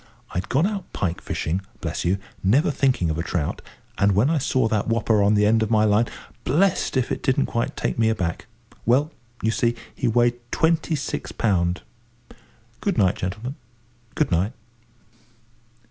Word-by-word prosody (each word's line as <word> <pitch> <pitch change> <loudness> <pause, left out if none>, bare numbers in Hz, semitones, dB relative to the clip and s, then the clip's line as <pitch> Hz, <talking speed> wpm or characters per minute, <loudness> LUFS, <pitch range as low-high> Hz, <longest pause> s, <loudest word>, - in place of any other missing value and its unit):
I'd 90 - -3
gone 140 +7 +3
out 200 -1 -3
pike 90 -3 -2
fishing, 90 +5 -2 0.2
bless - - -3
you, 90 +3 +2 0.3
never 130 - +3
thinking 130 - +1
of 80 - -3
a - - 0
trout, 85 -4 -2 0.4
and 100 0 +4
when 110 +10 +3
I 160 - +2
saw 130 -3 +1
that 110 -2 0
whopper 110 -2 +2
on 100 +1 +4
the 105 0 +4
end 110 +2 +4
of 110 - 0
my 110 -1 +4
line, 110 +2 +3 0.4
blest 170 0 +2
if 130 - 0
it - - -2
didn't 135 0 +2
quite 115 - -2
take - - -2
me 110 -1 +4
aback. 90 -7 -2 0.4
Well, 140 +7 +3 0.3
you 110 - +2
see, 120 +1 +1 0.2
he - - -1
weighed 120 +1 +3
twenty 160 -1 +2
six 145 - -4
pound. 90 -4 0 1.0
Good 200 -7 -1
night, 95 -4 +4
gentlemen, 105 +8 -4 0.6
good 155 - +1
night." 90 +7 +1
115 Hz, 170 wpm, -23 LUFS, 100-135 Hz, 1.0 s, and